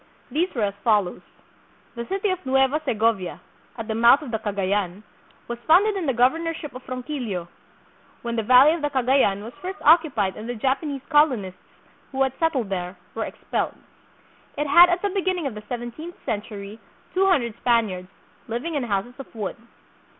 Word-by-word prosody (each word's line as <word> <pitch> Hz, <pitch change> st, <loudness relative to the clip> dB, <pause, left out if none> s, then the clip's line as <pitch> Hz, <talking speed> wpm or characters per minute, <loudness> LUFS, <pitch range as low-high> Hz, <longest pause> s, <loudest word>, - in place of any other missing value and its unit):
These 340 Hz, +5 st, +1 dB
were 230 Hz, -, 0 dB
as 200 Hz, -1 st, 0 dB
follows: 205 Hz, -6 st, +2 dB, 0.7 s
The 235 Hz, -1 st, -6 dB
City 390 Hz, +1 st, 0 dB
of 370 Hz, 0 st, -3 dB
Nueva 270 Hz, +3 st, +2 dB
Segovia, 220 Hz, -, 0 dB, 0.4 s
at 225 Hz, -2 st, -5 dB
the 220 Hz, -, -1 dB
mouth 235 Hz, +6 st, +5 dB
of 260 Hz, -, -7 dB
the 220 Hz, -, -1 dB
Cagayan, 200 Hz, -2 st, -1 dB, 0.4 s
was 235 Hz, 0 st, -5 dB
founded 400 Hz, +6 st, +5 dB
in 365 Hz, -5 st, -2 dB
the -, -, +3 dB
governorship 310 Hz, +5 st, 0 dB
of 255 Hz, -, -8 dB
Ronquillo, 245 Hz, -, -4 dB, 0.8 s
when 235 Hz, -1 st, -3 dB
the 225 Hz, -, +1 dB
valley 255 Hz, +7 st, +7 dB
of 335 Hz, -, -4 dB
the 295 Hz, -, 0 dB
Cagayan 255 Hz, -7 st, +2 dB
was 230 Hz, +3 st, -8 dB
first 375 Hz, +2 st, -5 dB
occupied 285 Hz, -, +4 dB
and 220 Hz, +2 st, -7 dB
the 245 Hz, -, -3 dB
Japanese 270 Hz, +3 st, -1 dB
colonists, 255 Hz, -, +2 dB, 0.5 s
who 270 Hz, 0 st, +1 dB
had 265 Hz, -1 st, 0 dB
settled 280 Hz, -10 st, 0 dB
there, 180 Hz, -1 st, -4 dB, 0.2 s
were 225 Hz, -, -2 dB
expelled. -, -, -3 dB, 0.8 s
It 295 Hz, -, 0 dB
had 345 Hz, +5 st, +8 dB
at 355 Hz, +1 st, 0 dB
the 405 Hz, -, +1 dB
beginning 370 Hz, -3 st, -1 dB
of 270 Hz, -, -2 dB
the 210 Hz, -, -8 dB
seventeenth 245 Hz, +8 st, -6 dB
century 210 Hz, 0 st, -5 dB, 0.3 s
two 385 Hz, +1 st, +3 dB
hundred 240 Hz, -, +2 dB
Spaniards, 215 Hz, -8 st, 0 dB, 0.4 s
living 240 Hz, +9 st, -3 dB
in 290 Hz, -, 0 dB
houses 220 Hz, 0 st, -2 dB
of 270 Hz, -, -8 dB
wood. 210 Hz, -4 st, -4 dB
250 Hz, 170 wpm, -24 LUFS, 215-305 Hz, 0.8 s, had